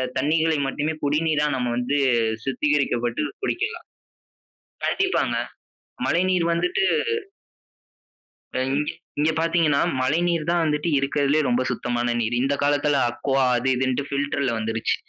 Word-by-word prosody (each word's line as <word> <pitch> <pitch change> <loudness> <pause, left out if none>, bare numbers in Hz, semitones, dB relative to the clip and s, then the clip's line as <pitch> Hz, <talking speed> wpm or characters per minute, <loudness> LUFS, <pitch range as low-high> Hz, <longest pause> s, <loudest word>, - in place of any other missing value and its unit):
தண்ணீகளை 155 +3 +2
மட்டுமே 150 +3 -2
குடிநீரா 150 +1 +1
நம்ம 125 -2 -1
வந்துட்டு 125 +4 0 0.4
சுத்திகரிக்கப்பட்டு 135 -2 0 0.2
குடிக்கலாம். 445 +4 -2 1.0
கண்டிப்பாங்க. 385 0 +1 0.7
மழைநீர் 180 0 +2
வந்துட்டு 360 - 0 1.7
ஆ - - +1
இங்க 150 +1 0 0.3
இங்கே 155 +2 +3
பார்த்தீங்கன்னா 165 -3 +2 0.2
மழைநீர் 165 +4 +1
தான் 175 0 +2
வந்துட்டு 150 +1 0
இருக்கதிலேயே 140 +2 +1
ரொம்ப 125 +1 +2
சுத்தமான 120 0 -1
நீர். 115 +1 0
இந்த 135 +2 +1
காலத்துல 145 0 +2
அக்வா 135 +2 0
அது 125 +2 0
இதுன் 130 0 0 0.2
பில்டர்ல 140 -1 0
வந்துருச்சு. 110 0 -1
145 Hz, 110 wpm, -23 LUFS, 130-160 Hz, 1.7 s, இங்கே